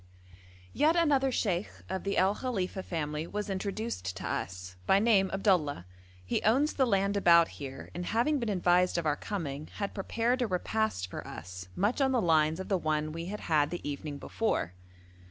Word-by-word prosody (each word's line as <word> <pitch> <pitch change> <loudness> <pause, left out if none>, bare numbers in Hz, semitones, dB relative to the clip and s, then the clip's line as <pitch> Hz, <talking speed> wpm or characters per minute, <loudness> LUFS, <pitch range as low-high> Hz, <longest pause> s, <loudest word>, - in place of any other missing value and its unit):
Yet 310 +3 +3
another 285 -6 +3
sheikh 195 -5 0 0.2
of 190 0 -3
the 200 - -1
El 190 +2 +4
Khalifa 200 -6 -3
family 155 -3 -3
was 210 +1 -3
introduced 190 - -3
to - - -6
us, 90 +1 -4
by 195 - +6
name 200 -3 +4
Abdullah; 180 - +1 0.4
he - - 0
owns 270 +8 +3
the 265 -2 +2
land 200 -1 +2
about 170 -4 +6
here, 135 -2 -8
and 175 0 -4
having 250 +7 +2
been 235 -3 -2
advised 180 -2 +3
of 170 - -1
our 150 -1 +2
coming, 155 -7 -5
had 200 -1 -3
prepared 230 +5 0
a 245 - +2
repast 190 - -1
for - - -7
us, 90 +3 -8
much 210 +8 +1
on 265 -1 +3
the 250 - +3
lines 160 -3 +3
of 190 - -5
the 190 -3 +1
one 155 -1 -1
we 165 +2 -5
had 210 +4 -5
had 150 -3 +2
the 175 -1 -5
evening 145 0 -4
before. 215 - -1
185 Hz, 185 wpm, -30 LUFS, 155-220 Hz, 0.4 s, by